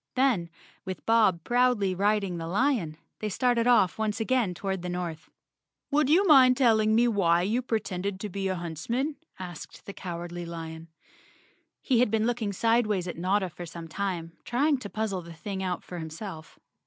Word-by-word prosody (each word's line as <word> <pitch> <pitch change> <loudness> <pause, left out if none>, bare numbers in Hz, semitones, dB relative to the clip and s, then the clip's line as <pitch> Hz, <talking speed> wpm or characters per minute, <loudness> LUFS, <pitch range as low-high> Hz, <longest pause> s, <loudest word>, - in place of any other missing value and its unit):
Then, 250 -10 +2 0.3
with 185 0 -6
Bob 215 -7 +3
proudly 245 -6 +2
riding 200 -2 0
the 165 - -5
lion, 195 - 0 0.2
they 215 - -2
started 240 +2 +1
off 220 -6 +4
once 215 0 -1
again 225 -5 +1
toward 190 0 -3
the 180 - -4
north. 175 -3 -5 0.6
"Would 290 -1 +3
you 360 +6 +5
mind 260 -6 +7
telling 220 -4 +4
me 240 +2 +4
why 175 -6 +3
you 225 +6 +1
pretended 200 -5 -2
to 210 - -3
be 195 0 -3
a 190 - -1
huntsman?" 205 - -3 0.2
asked 180 -4 -9
the 200 - -7
Cowardly 175 -1 -6
lion. 165 -1 -7 1.0
He 250 -4 +2
had 245 - +4
been 220 0 +1
looking 235 -3 -1
sideways 215 -3 +1
at 175 - -4
Notta 190 +2 +1
for 175 +2 -8
some 165 0 -8
time, 175 -2 -3
trying 280 +3 +1
to 205 - -7
puzzle 215 -4 -2
the 170 0 -11
thing 190 +4 -5
out 180 -2 -2
for 180 - -7
himself. 160 +1 -8
200 Hz, 175 wpm, -28 LUFS, 175-235 Hz, 1.0 s, mind